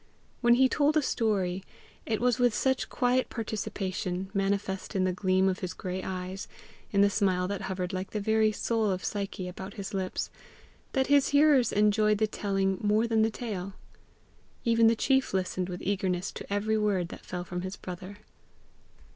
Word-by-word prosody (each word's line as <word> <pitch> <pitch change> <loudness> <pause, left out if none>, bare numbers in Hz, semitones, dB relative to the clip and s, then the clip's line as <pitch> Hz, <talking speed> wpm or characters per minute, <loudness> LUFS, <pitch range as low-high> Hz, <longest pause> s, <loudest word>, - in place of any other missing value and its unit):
When 240 -1 +6
he 260 +1 +5
told 295 +3 +2
a 305 - +3
story, 195 -7 0 0.4
it 220 -1 0
was 250 0 +2
with 245 -3 +3
such 265 -1 +1
quiet 250 0 +1
participation, 195 -4 -3
manifest 195 0 -1
in 190 - +2
the 185 0 +1
gleam 185 0 +2
of 185 0 0
his 185 -1 -4
gray 185 0 -4
eyes, 185 +1 -5 0.4
in 200 - +2
the 200 - +6
smile 185 -3 +1
that 200 0 -3
hovered 185 -1 -3
like 185 +1 -3
the 215 - -3
very 220 +1 +3
soul 220 0 0
of 185 -1 -2
Psyche 195 -2 -3
about 190 +2 -8
his 200 -1 -6
lips, 190 -1 -2 0.6
that 265 -1 +2
his 285 0 +4
hearers 285 -3 +4
enjoyed 210 0 +3
the 215 - +3
telling 195 -2 -1
more 210 +2 +3
than 225 -1 +2
the 220 - +3
tale. 205 -5 -5 0.9
Even 230 -1 +5
the 230 - +4
chief 265 -2 +1
listened 185 -1 -1
with 180 -1 -6
eagerness 185 -2 -1
to - - -9
every 215 +2 +1
word 195 -5 +1
that - - -10
fell 180 -1 -5
from 180 0 -5
his 185 +1 -5
brother. 185 +2 -8
200 Hz, 180 wpm, -29 LUFS, 185-225 Hz, 0.9 s, When